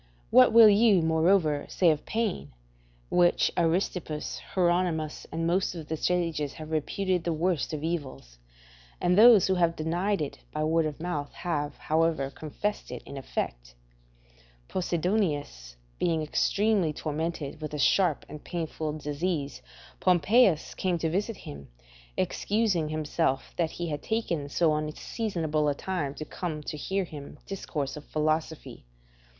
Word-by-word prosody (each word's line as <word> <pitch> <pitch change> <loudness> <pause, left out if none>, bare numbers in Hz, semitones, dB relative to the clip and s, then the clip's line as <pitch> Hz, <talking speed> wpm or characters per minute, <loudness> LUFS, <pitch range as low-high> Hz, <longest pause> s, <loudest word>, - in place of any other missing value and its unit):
What 130 - +7
will 225 0 +9
you, 205 -3 +5
moreover, 160 -2 +2
say 175 -3 +4
of 150 -1 -3
pain, 210 - -2 0.6
which 175 -1 +3
Aristippus, 165 -2 -1 0.2
Hieronimus, 175 -4 0
and 165 0 -2
most 180 +2 +1
of 160 -3 -8
the 160 - -1
sages 165 -4 -1
have 155 0 -9
reputed 180 +3 0
the 170 - -1
worst 165 0 0
of 155 -1 -4
evils; 135 - -5 0.6
and 180 0 +2
those 220 -2 +8
who 190 - +2
have 170 -2 +2
denied 175 +6 0
it 150 -2 -4
by 155 - -2
word 160 0 +2
of 150 -1 -6
mouth 155 -4 -3
have, 150 -5 -3
however, 160 -3 0
confessed 180 +9 -4
it - - -7
in 140 - -9
effect? - - -5 0.9
Posidonius 160 - -1 0.2
being 165 -2 +1
extremely 200 +3 +1
tormented 155 0 -4
with 155 - -5
a 150 - -4
sharp 165 +3 +2
and 150 0 -10
painful 160 -3 -3
disease, 150 0 -3 0.4
Pompeius 185 +1 +3
came 180 -2 -1
to 160 -1 -1
visit 205 +4 -1
him, 70 -1 -10 0.5
excusing 200 -7 0
himself 155 -3 -1
that 165 -2 0
he 175 -1 -4
had 145 -1 -3
taken 170 -10 -2
so 160 +1 +2
unseasonable 155 0 -1
a 145 - 0
time 145 -5 -3
to 155 - -6
come 155 -3 -5
to 150 - -5
hear 190 +6 -1
him 150 -5 -9
discourse 150 -7 -4
of 150 - -8
philosophy. 155 - -2
160 Hz, 145 wpm, -28 LUFS, 150-180 Hz, 0.9 s, will